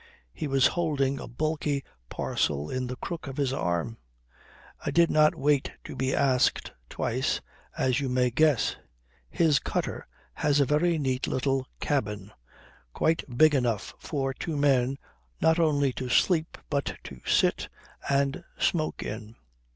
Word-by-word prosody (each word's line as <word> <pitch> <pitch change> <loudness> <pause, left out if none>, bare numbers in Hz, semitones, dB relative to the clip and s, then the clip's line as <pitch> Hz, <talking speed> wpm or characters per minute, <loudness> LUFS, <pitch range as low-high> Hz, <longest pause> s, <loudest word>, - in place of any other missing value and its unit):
He 155 - -4
was 135 -1 +3
holding 140 -4 +1
a - - -7
bulky 150 +2 -1 0.3
parcel 75 0 -1
in 130 -1 -2
the 125 - -4
crook 165 +4 -6
of 135 +1 -7
his 135 -3 0
arm. 85 +3 -2 0.8
I - - -1
did 170 0 +4
not 155 0 +4
wait 145 -1 +1
to - - -8
be 130 0 0
asked 130 -2 +2 0.2
twice, - - -1 0.4
as 130 +1 +2
you 135 -2 -2
may 125 0 +2
guess. 150 -1 +2 0.5
His 155 -4 +3
cutter - - -3 0.3
has 145 -1 +1
a 140 - +4
very 160 +5 +2
neat 130 -3 -1
little 135 0 0
cabin, 105 -8 -2 0.6
quite 165 +1 +1
big 155 +1 +6
enough 120 -6 0
for 135 -3 -2
two 155 +3 -4
men 135 -2 +2 0.4
not 160 +1 +3
only 145 -5 +2
to 130 0 -5
sleep 165 +4 +2
but 140 -1 -1
to 65 -2 -10
sit - - +2 0.4
and 140 0 +1
smoke 155 -3 0
in. 110 +1 -6
140 Hz, 145 wpm, -27 LUFS, 125-150 Hz, 0.8 s, big